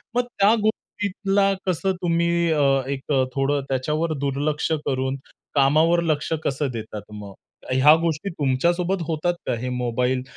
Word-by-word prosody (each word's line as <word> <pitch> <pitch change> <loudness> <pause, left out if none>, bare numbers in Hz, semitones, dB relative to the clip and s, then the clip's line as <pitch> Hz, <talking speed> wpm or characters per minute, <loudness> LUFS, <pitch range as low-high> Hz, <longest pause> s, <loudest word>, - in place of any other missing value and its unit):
मग 245 - +3 0.2
त्या 205 +3 +6
गोष्टीला 200 -2 0
कसं 185 +2 0
तुम्ही 170 0 +1
अ, 150 -2 +2 0.2
एक 140 +1 -4
अ, 135 -2 +3
थोडं 140 +1 +1
त्याच्यावर 150 +5 -1
दुर्लक्ष 145 +3 -1
करून 130 0 -1 0.4
कामावर 155 +5 +4
लक्ष 155 -2 -1
कसं 140 +1 -1
देतात 110 -2 -7
मग? 105 -2 -8 0.4
ह्या 130 +4 +6
गोष्टी 165 +3 -1
तुमच्यासोबत 170 +5 0
होतात 170 +2 0
का? - - +1
हे 125 +2 -3
मोबाईल 125 +1 -1
150 Hz, 140 wpm, -23 LUFS, 130-170 Hz, 0.4 s, त्या